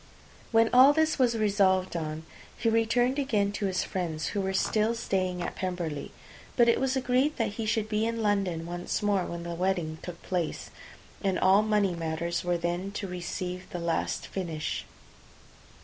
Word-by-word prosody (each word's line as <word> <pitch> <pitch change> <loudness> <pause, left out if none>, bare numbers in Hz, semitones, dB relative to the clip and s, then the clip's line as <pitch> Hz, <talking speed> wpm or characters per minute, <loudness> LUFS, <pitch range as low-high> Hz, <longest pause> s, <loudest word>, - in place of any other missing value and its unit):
When 225 0 +5
all 260 +3 +8
this 315 -1 +1
was 240 -3 +3
resolved 195 -4 +2
on, 155 -1 -3 0.3
he 230 - +1
returned 240 +4 +2
again 210 -8 +1
to 205 0 -2
his 185 -1 0
friends, 165 -5 -3
who 200 - -1
were 190 0 -1
still 215 +4 +1
staying 185 -5 -1
at - - -3
Pemberley; 175 -6 -3 0.5
but 240 -2 +6
it 235 - +4
was 265 0 +1
agreed 260 +3 +1
that 225 -4 +1
he 215 +2 -4
should 215 -1 0
be 215 +1 0
in 230 -1 -2
London 195 -6 0
once 175 +3 -3
more 200 -3 +2
when 170 0 -5
the 170 0 -4
wedding 175 -3 -1
took 175 -1 -8
place, 175 -4 -3 0.5
and 190 -2 +1
all 190 +2 +5
money 210 -3 +2
matters 170 +1 -2
were 175 -1 +1
then 175 +3 -2
to 205 - -4
receive 180 0 -5
the - - -5
last 170 -1 -1
finish. 165 -5 -4
190 Hz, 175 wpm, -28 LUFS, 175-225 Hz, 0.5 s, all